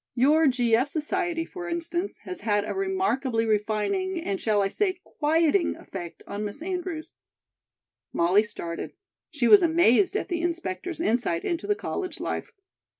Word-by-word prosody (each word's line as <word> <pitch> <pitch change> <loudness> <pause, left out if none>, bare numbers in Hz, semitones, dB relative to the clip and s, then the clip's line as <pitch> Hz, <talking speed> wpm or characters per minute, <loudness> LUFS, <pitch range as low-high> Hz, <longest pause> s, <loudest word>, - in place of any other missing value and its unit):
Your 295 +5 +4
G. 245 -3 +3
F. 250 +5 +2
Society, 330 +3 -1
for 350 -1 -7
instance, 345 +3 -3
has 365 - -6
had 205 -2 +1
a - - -2
remarkably 375 -12 0
refining 220 - 0
and, 200 -11 -3
shall 210 -2 +2
I - - +2
say, 370 - -1
quieting 325 +3 +2
effect 175 -3 -8
on 205 +1 -5
Miss 210 +9 -6
Andrews 355 -3 -4 0.5
" - - -66
Molly 180 +4 +4
started. 170 -6 -6 0.4
She 270 -6 0
was 405 - +8
amazed 340 - +4
at - - -1
the 345 -2 -2
inspector's 335 - -3
insight 225 - 0
into 340 +3 -2
the 415 - +2
college 370 -2 -4
life. - - -3
315 Hz, 155 wpm, -26 LUFS, 215-350 Hz, 0.5 s, was